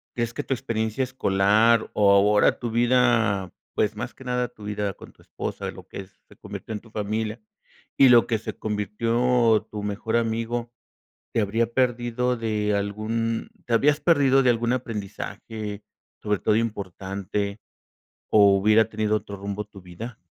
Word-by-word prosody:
¿crees 115 -1 -2
que - - -4
tu - - -1
experiencia 110 +1 -2
escolar 110 -2 +2
o 100 -1 +4
ahora 105 +1 +4
tu 120 -2 -4
vida, 115 -5 +2 0.2
pues, - - +1
más - - -6
que 130 - -13
nada 125 -1 -1
tu 110 -3 -16
vida 105 -1 -2
con - - -13
tu - - -24
esposa, - - -5
lo - - -11
que 95 - -8
se - - -23
convirtió 110 - -8
en 105 - -4
tu 115 - -19
familia, 110 +1 -3 0.6
y 135 - +7
lo 120 -2 +7
que 110 -2 0
se 110 - -7
convirtió 115 +3 +1
en - - -7
tu 105 -1 -6
mejor 105 +2 -2
amigo, 115 +1 -2 0.6
te - - +3
habrías 110 +3 0
perdido 125 0 0
de 105 -2 -1
algún 110 +3 -2 0.2
te 120 - -4
habrías 145 +5 +4
perdido 135 -5 +4
de 125 - +5
algún 120 0 +1
aprendizaje, 105 -2 -6 0.4
sobre 105 -1 0
todo 105 - +1
importante, 100 -1 -3 0.7
o 100 -2 +6
hubiera 110 +3 +4
tenido 110 -1 0
otro 100 -1 -8
rumbo 100 +1 -4
tu 100 -2 -14
vida? 110 +7 -9
110 Hz, 160 wpm, -24 LUFS, 105-120 Hz, 0.7 s, y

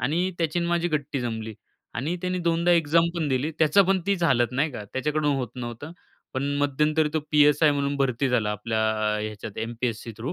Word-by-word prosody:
आणि 175 +6 0
त्याची 165 0 0
आणि 170 0 -1
माझी 175 0 +1
गट्टी 145 -3 -2
जमली 110 -2 -4 0.4
आणि 145 +10 -2
त्याने 180 0 -1
2दा 170 +1 +2
एक्झाम 165 0 +3
पण 165 -3 -1
दिली, 130 +4 0
त्याचा 160 +5 +5
पण 195 -1 +3
तीच 195 -3 0
हालत 125 -6 +2
नाही 145 +4 0
का, 105 -5 -7
त्याच्याकडून 150 +2 0
होत 125 -4 -2
नव्हतं. 125 +5 -7 0.4
पण 130 - -1
मध्यंतरी 150 +2 +1
तो 155 - +2
पी-एस-आय 150 0 +5
म्हणून 140 0 -1
भरती 135 -1 0
झाला 115 -4 +1
आपल्या 110 +2 -2 0.4
ह्याच्यात 105 -1 -7
एमपीएससी 115 0 -3
थ्रू. 125 +9 -4
145 Hz, 185 wpm, -25 LUFS, 120-160 Hz, 0.4 s, त्याचा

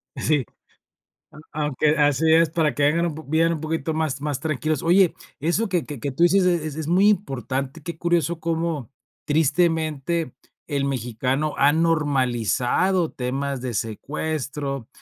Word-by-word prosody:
Sí. 150 -5 +1 0.9
A - - -13 0.2
aunque 150 +1 +1
así 145 +2 +3
es, 165 -1 +5
para 160 -3 +1
que 145 - -1
vengan 165 +4 +2
un 160 - -3
po 155 - -8
vivan 165 +3 +2
un 155 - -5
poquito 160 -1 -2
más 155 -4 -1
más 145 -3 -3
tranquilos. 155 -1 -1
Oye, 180 +1 +4 0.3
eso 175 +9 0
que 175 -4 -1
que 145 -4 -7
qué 140 +1 -3
tú 165 - -1
dices 185 +2 +5
es 175 -3 +2
es 155 -2 -5
es 160 -2 -4
muy 190 +5 +4
importante, 140 -5 -2
qué 170 0 -6
curioso 170 -1 0
cómo 165 -6 -2 0.4
tristemente 160 -1 +1 0.3
el 140 -3 -1
mexicano 130 +3 -1
ha 145 +1 +4
normalizado 150 - +1
temas 135 +1 -3
de 125 -2 -3
secuestro, 140 +3 -4
155 Hz, 155 wpm, -23 LUFS, 135-165 Hz, 0.9 s, es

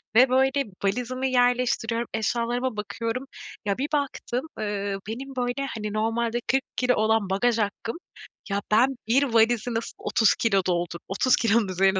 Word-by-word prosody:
ve, 250 +3 +7
böyle, 265 +2 +3 0.2
valizimi 250 +6 -1
yerleştiriyorum, 245 -2 +1
eşyalarıma 235 +2 -1
bakıyorum. 230 +4 -3 0.4
Ya, 200 -1 0
bir 280 +3 -1
baktım, 275 -2 -2
ııı, 200 -2 -2
benim, 265 +5 -6
böyle, 250 +2 -1
hani, 210 -1 -4
normalde 230 +2 0
40 265 +1 +1
kilo 250 0 +2
olan 220 -2 +2
bagaj 230 +5 +2
hakkım 220 +4 -2 0.5
ya, 200 +1 0
ben 250 +5 +4
bir 255 +5 +4
valizi 235 -1 +2
nasıl 225 0 -3
30 220 -3 +2
kilo 195 -4 +2
doldur 175 -1 -1
30 240 +6 +3
kilonun 225 -2 +2
üzerine 190 +1 +2
230 Hz, 150 wpm, -25 LUFS, 210-250 Hz, 0.5 s, ve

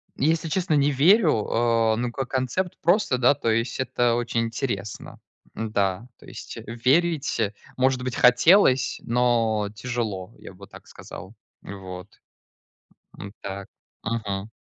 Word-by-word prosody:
Если 160 +4 +1
честно 170 0 -1
не 145 0 +3
верю. 150 - +4
А, 115 -1 +2
ну, 120 +1 -2
как 135 +1 -4
концепт 130 +8 -2
просто, 175 - +2
да, 125 +3 +4
то 115 - -2
есть 115 +3 -1
это 120 -2 +1
очень 120 -1 -1
интересно. 115 -3 -4 0.4
Н-да. 105 0 -1
То - - -17
есть - - -9
верить, 135 +6 +1
э, 105 -2 0 0.2
может 130 0 +1
быть, 130 -1 -3
хотелось, 130 - +4
но 115 -3 +1
тяжело, 115 -5 -4
я - - -12
бы 100 +1 -14
так - - -15
сказал, - - -11 0.3
вот, 95 -1 -9 1.1
а, - - -8 0.2
так. 100 0 -6 0.4
Мгм. 105 -2 -3
120 Hz, 135 wpm, -24 LUFS, 110-135 Hz, 1.1 s, верю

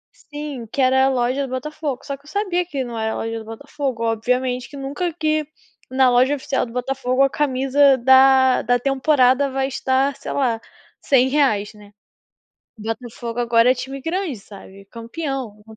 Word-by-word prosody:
Sim, 290 -5 -8
que - - -6
era 265 +1 +4
a - - +3
loja 255 +1 0
do - - -11
Botafogo, 285 0 -4
só 280 - -4
que 280 - -28
eu - - -14
sabia 360 -1 -1
que 280 -6 -3
não 240 -2 -6
era 220 0 -1
a - - -4
loja 225 0 -4
do 220 - -10
Botafogo, 260 +1 -5
obviamente 250 +3 -1
que 285 - -10
nunca 285 +6 -3
que 310 -1 0 0.5
na 260 0 +4
loja 255 +3 +3
oficial 270 -1 -2
do 230 - -12
Botafogo, 255 +1 0
a 275 - +3
camisa 270 0 +3
da 260 +1 +5
da 245 +2 +2
temporada 270 0 +2
vai 265 0 -1
estar, 265 +1 0
sei - - -7
lá, 240 -5 0 0.4
R$100, 260 -6 +2
né. 210 -1 -16 0.9
Botafogo 230 +2 -5
agora 235 0 +4
é - - -4
time 265 +2 -7
grande, 340 -3 -2
sabe, 195 -1 -14
campeão. 235 -2 -6
260 Hz, 170 wpm, -21 LUFS, 240-280 Hz, 0.9 s, da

